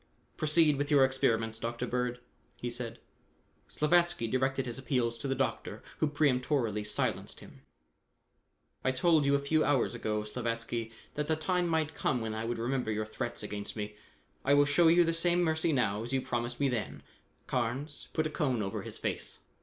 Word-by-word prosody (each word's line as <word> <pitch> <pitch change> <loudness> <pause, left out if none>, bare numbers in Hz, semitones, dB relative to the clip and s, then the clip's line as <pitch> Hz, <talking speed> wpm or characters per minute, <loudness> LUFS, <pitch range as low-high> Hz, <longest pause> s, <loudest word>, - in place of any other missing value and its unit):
"Proceed 155 -1 +4
with 145 0 -1
your 140 -3 +6
experiments, 115 -4 0
Dr. 120 +1 -3
Bird," 125 0 -1 0.4
he 120 - -4
said. 120 -1 -5 0.7
Slavatsky 170 -6 +2
directed 130 +2 0
his 120 0 -4
appeals 120 -2 0
to 140 - -4
the 135 - 0
doctor, 115 -4 -2 0.2
who 155 - +3
peremptorily 130 -6 +1
silenced 105 0 -2
him. - - -14 1.2
"I 130 - +2
told 155 +2 +3
you 140 0 +4
a - - +5
few 155 +3 +2
hours 140 -5 +2
ago, 105 -2 -2
Slavatsky, 115 0 -3 0.2
that 150 0 -2
the 160 - +2
time 180 +3 0
might 160 -2 0
come 130 -4 0
when 110 -1 -3
I 110 +1 -3
would 120 0 -2
remember 125 +1 -1
your 110 0 -1
threats 120 +2 -4
against 100 -1 -5
me. 105 -1 -5 0.5
I 140 +1 +4
will 145 0 +6
show 145 +4 +4
you 175 +2 +6
the 165 0 +1
same 175 +1 +2
mercy 160 0 +1
now 110 -7 +1
as 120 +3 -4
you 135 - +3
promised 120 0 -2
me 140 - +3
then. 120 -4 -3 0.4
Carnes, 130 +4 -2
put 155 - 0
a - - 0
cone 130 -7 0
over 95 - -3
his - - -5
face." - - -3
130 Hz, 185 wpm, -31 LUFS, 115-150 Hz, 1.2 s, your